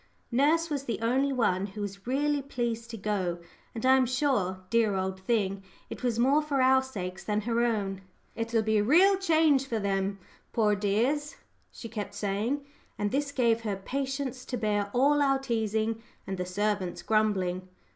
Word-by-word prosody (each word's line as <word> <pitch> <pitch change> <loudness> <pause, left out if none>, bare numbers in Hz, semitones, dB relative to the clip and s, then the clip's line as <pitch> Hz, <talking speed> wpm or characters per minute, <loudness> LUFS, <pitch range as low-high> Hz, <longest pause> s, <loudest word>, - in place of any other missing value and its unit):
Nurse 305 +7 +3
was 280 -2 -2
the 230 -5 -2
only 260 +5 +2
one 200 -7 +1
who 205 +1 -8
was 200 +1 -6
really 290 +2 +1
pleased 235 -4 -3
to 230 - -6
go; 190 -4 -1 0.4
and 225 - -3
I 260 0 +7
am 260 -1 +3
sure, 245 -9 0
dear 225 -3 +3
old 190 0 -2
thing, 195 -1 0 0.3
it - - -6
was 245 -3 0
more 270 +5 +4
for 295 -2 -1
our 260 0 +5
sakes 190 -8 -6
than 210 0 0
her 235 +2 0
own. 200 -5 -1 0.3
"It'll 230 -1 0
be 220 0 +2
a - - +2
real 360 - +6
change 315 -7 +3
for 230 - -1
them, 195 -1 -1 0.4
poor 215 -2 +3
dears," 240 +9 0 0.4
she 230 - -8
kept 210 -3 -6
saying; 210 +8 -1 0.3
and 205 -1 -1
this 285 +1 -1
gave 235 -4 +2
her 210 -3 -2
patience 265 +4 -3
to 250 - -3
bear 205 -2 0
all 285 +5 +3
our 275 -1 +3
teasing 225 -3 -1 0.2
and 190 - -3
the 180 - -2
servants' 200 -1 -1
grumbling. 190 -4 +1
230 Hz, 175 wpm, -28 LUFS, 205-270 Hz, 0.4 s, I